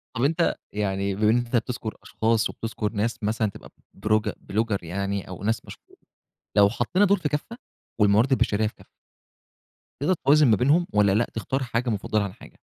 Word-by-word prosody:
طب، 120 Hz, -, -1 dB
أنت 165 Hz, +4 st, +2 dB, 0.2 s
يعني 100 Hz, -1 st, -1 dB
بما 105 Hz, +1 st, +2 dB
إن 115 Hz, -, +3 dB
أنت 120 Hz, 0 st, -2 dB
بتذكُر 120 Hz, -1 st, -2 dB
أشخاص 115 Hz, 0 st, +1 dB
وبتذكُر 110 Hz, -2 st, -4 dB
ناس 115 Hz, +2 st, -2 dB
مثلًا 110 Hz, +1 st, 0 dB
تبقى -, -, -12 dB, 0.2 s
بورج 110 Hz, +1 st, 0 dB
بلوجر 110 Hz, -2 st, -1 dB
يعني 100 Hz, +3 st, -3 dB
أو 95 Hz, 0 st, -8 dB
ناس 110 Hz, +2 st, -1 dB
مشهو -, -, -14 dB, 0.6 s
لو 100 Hz, -1 st, +7 dB
حطّينا 145 Hz, -, +1 dB
دول 200 Hz, +1 st, +3 dB
في 150 Hz, -, -1 dB
كفّة 150 Hz, +11 st, -4 dB, 0.4 s
والموارد 105 Hz, +5 st, +4 dB
البشرية 110 Hz, -4 st, +2 dB
في 105 Hz, -, -8 dB
كفّة -, -, -19 dB, 1.1 s
تقدر 155 Hz, +6 st, +3 dB
توازن 145 Hz, +1 st, +6 dB
ما 110 Hz, -, +5 dB
بينهم 150 Hz, -, +3 dB
والّا 105 Hz, -1 st, +4 dB
لأ، 110 Hz, +4 st, +2 dB
تختار 130 Hz, +5 st, -2 dB
حاجة 120 Hz, 0 st, -1 dB
مُفضّلة 105 Hz, 0 st, 0 dB
عن 100 Hz, -2 st, -5 dB
حاجة؟ -, -, -16 dB
110 Hz, 180 wpm, -25 LUFS, 105-125 Hz, 1.1 s, لو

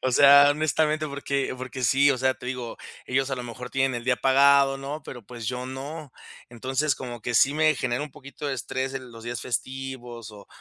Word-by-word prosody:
o 130 Hz, -, 0 dB
sea, 140 Hz, +2 st, +8 dB
honestamente, 155 Hz, +1 st, +1 dB
porque 140 Hz, -1 st, -2 dB
porque 130 Hz, 0 st, -6 dB
sí, 140 Hz, +4 st, +4 dB
o 130 Hz, -, 0 dB
sea, 130 Hz, 0 st, +2 dB
te -, -, -14 dB
digo, 125 Hz, -2 st, -5 dB, 0.3 s
ellos 135 Hz, +1 st, 0 dB
a -, -, 0 dB
lo 125 Hz, -, -6 dB
mejor 125 Hz, +1 st, -8 dB
tienen 135 Hz, -1 st, +1 dB
el 120 Hz, 0 st, -5 dB
día 125 Hz, -1 st, +2 dB
pagado, 135 Hz, +1 st, +5 dB
¿no?, 140 Hz, +3 st, -6 dB
pero 120 Hz, -2 st, -9 dB
pues 115 Hz, 0 st, -8 dB
yo 125 Hz, +1 st, -3 dB
no. 140 Hz, +2 st, -7 dB, 0.4 s
Entonces, 130 Hz, +5 st, -1 dB
como 120 Hz, -3 st, -7 dB
que 120 Hz, -, -3 dB
sí 140 Hz, +2 st, +4 dB
me 155 Hz, 0 st, +3 dB
genera 125 Hz, +1 st, -1 dB
un 150 Hz, -, -7 dB
poquito 140 Hz, +3 st, -9 dB
de 140 Hz, -, -1 dB
estrés 130 Hz, +2 st, -3 dB
en 130 Hz, -2 st, -7 dB
los 115 Hz, 0 st, -12 dB
días 120 Hz, -1 st, -4 dB
festivos 125 Hz, -2 st, -5 dB
o 105 Hz, -1 st, -13 dB
130 Hz, 215 wpm, -25 LUFS, 125-140 Hz, 0.4 s, sea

